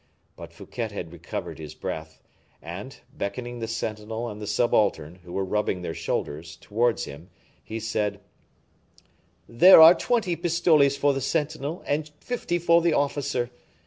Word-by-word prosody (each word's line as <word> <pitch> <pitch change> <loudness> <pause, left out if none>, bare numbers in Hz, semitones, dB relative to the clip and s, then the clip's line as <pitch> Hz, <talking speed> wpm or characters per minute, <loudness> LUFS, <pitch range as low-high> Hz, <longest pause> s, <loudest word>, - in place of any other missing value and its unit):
But - - -10
Fouquet 120 -2 -5
had 95 -6 -7
recovered 85 -1 -6
his 75 -2 -8
breath, 80 0 -6 0.4
and, - - -8 0.2
beckoning 120 +4 -5
the 115 - -3
sentinel 110 +1 -4
and 105 0 -8
the 105 - -5
subaltern, 105 -6 +1
who 90 - -12
were 95 +1 -1
rubbing 95 -2 -1
their 80 - -3
shoulders, 80 +1 -4
towards 115 +3 0
him, 80 +6 -11 0.3
he 110 - -5
said, 105 -2 -2 1.3
"There 160 +12 +8
are 160 +2 +11
twenty 190 -1 0
pistoles 160 -5 +3
for 140 0 +3
the 135 - -3
sentinel, 155 +2 -2
and 150 +1 -1
fifty 235 -8 -2
for 170 0 +4
the 170 -1 +2
officer. 140 -4 -1
120 Hz, 145 wpm, -25 LUFS, 100-150 Hz, 1.3 s, are